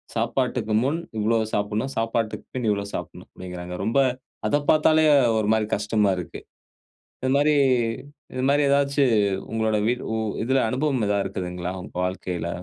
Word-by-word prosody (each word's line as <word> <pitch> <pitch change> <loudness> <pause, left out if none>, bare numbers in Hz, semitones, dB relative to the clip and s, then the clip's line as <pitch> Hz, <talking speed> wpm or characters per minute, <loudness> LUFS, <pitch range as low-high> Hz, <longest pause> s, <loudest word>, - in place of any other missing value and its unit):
சாப்பாட்டுக்கு 115 -1 -1
முன் 145 +5 0 0.2
இவ்ளோ 110 +2 +2 0.2
சாப்பட்ணும். 105 +5 -1
சாப்பாட்டுக்கு 115 -1 -1
பின் 125 -3 -1
இவ்ளோ 100 -1 -1
சாப்பட்னும் - - -7
அப்டிங்குறாங்க. 90 -1 -7
ரொம்ப 115 +5 +1 0.5
அத 145 - +2
பார்த்தாலே 155 0 +4 0.3
ஒரு 110 -1 0
மாரி 110 -1 +1
கஷ்டமா 105 0 +1
இருக்கு. 90 -3 -6 0.8
இந்த 130 - -1
மாரி 150 +1 +3 0.8
இந்த 130 - -3
மாரி 145 +1 +3
ஏதாச்சு 140 0 +3 0.5
உங்களுடைய 110 +1 +1 0.2
உ - - 0 0.3
இதுல 130 +2 +2
அனுபவம் 130 -2 0
ஏதா 100 0 +1
இருக்குதுங்களா, 90 -1 -4
உங்க - - -12
வாழ்க்கையில? 90 -2 -3
110 Hz, 140 wpm, -24 LUFS, 105-135 Hz, 0.8 s, பார்த்தாலே